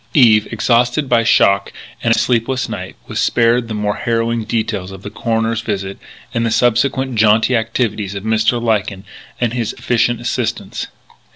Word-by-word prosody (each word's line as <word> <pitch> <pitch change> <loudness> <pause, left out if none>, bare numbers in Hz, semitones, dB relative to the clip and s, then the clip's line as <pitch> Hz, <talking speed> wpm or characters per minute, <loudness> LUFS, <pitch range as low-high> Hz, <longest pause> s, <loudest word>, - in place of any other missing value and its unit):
Eve, 110 -6 +5
exhausted 125 +4 +1
by 120 -2 +3
shock 100 -3 +3 0.3
and 115 - +1
a - - +4
sleepless 125 +1 0
night, - - -6
was - - -4
spared 115 0 +2
the 110 - -4
more 105 -1 -1
harrowing 115 0 -1
details 110 -4 -2
of 95 0 -11
the 100 - -7
coroner's 115 0 -1
visit 100 -3 -4 0.3
and 115 - 0
the 115 - +1
subsequent 130 +3 +1
jaunty 110 +2 +3
activities 110 -3 -1
of 100 - -5
Mr. 110 +2 +1
Lyken 105 -4 -1 0.4
and 120 -2 0
his 120 -4 -2
efficient 120 0 0
assistants. 120 - -3
115 Hz, 160 wpm, -17 LUFS, 105-120 Hz, 0.4 s, Eve